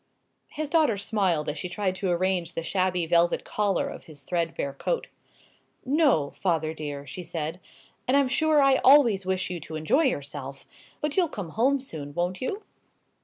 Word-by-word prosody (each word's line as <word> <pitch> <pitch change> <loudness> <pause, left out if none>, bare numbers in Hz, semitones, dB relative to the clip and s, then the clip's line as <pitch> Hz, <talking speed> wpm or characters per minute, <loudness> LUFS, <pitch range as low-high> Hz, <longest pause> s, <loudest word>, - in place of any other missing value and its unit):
His 310 0 -4
daughter 300 -8 +3
smiled 190 -7 0
as 150 0 -3
she 180 - -4
tried 185 +1 -1
to 190 0 -1
arrange 180 -1 0
the 165 - -2
shabby 180 0 0
velvet 170 +1 +2
collar 205 -3 0
of - - -8
his 145 -3 -12
threadbare 165 -3 -2
coat. - - -2 0.8
"No, 270 - +3
father 160 -4 -1
dear," 145 -2 -6
she 145 +6 -7
said; 165 0 -4 0.5
"and 260 +3 +4
I'm 280 -2 +3
sure 300 +2 +3
I 270 -1 +5
always 240 -10 +5
wish 185 -1 -1
you 175 - -4
to 155 +1 -8
enjoy 155 - +2
yourself. 140 - -4 0.4
But 300 +2 -2
you'll 350 -4 +3
come 195 - -6
home 265 +10 +2
soon, 150 - -8
won't 175 +2 -1
you?" 400 +11 -3
185 Hz, 170 wpm, -26 LUFS, 160-260 Hz, 0.8 s, I